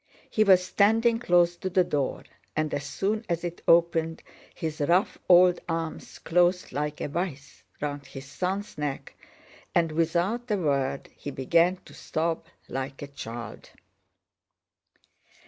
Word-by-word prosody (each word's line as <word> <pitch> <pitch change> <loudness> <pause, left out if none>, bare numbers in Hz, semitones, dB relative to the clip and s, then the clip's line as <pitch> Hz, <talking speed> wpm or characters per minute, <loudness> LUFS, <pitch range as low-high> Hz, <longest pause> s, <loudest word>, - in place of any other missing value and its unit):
He 215 - +4
was 185 -3 +5
standing 225 +4 +3
close 175 -5 +3
to 185 - -3
the 185 0 +3
door 145 -6 -2 0.3
and 155 -1 -1
as 140 - -2
soon 205 +9 -1
as 170 0 -1
it 175 0 -5
opened 165 -1 +3 0.3
his 155 -1 -4
rough 175 +7 +2
old 180 0 +7
arms 165 -1 -4
closed 175 +2 +2
like 150 +2 -3
a - - -2
vise 145 -3 -5 0.2
round 145 -1 -4
his 135 0 -9
son's 190 +6 -3
neck, 145 -2 -4 0.6
and 165 -2 +3
without 175 +9 0
a 210 - +2
word 140 -5 -1
he - - -7
began 165 +7 +2
to - - -14
sob 165 +1 -2 0.2
like 135 +2 -5
a - - -6
child. 120 -4 -8
165 Hz, 140 wpm, -27 LUFS, 145-180 Hz, 0.6 s, old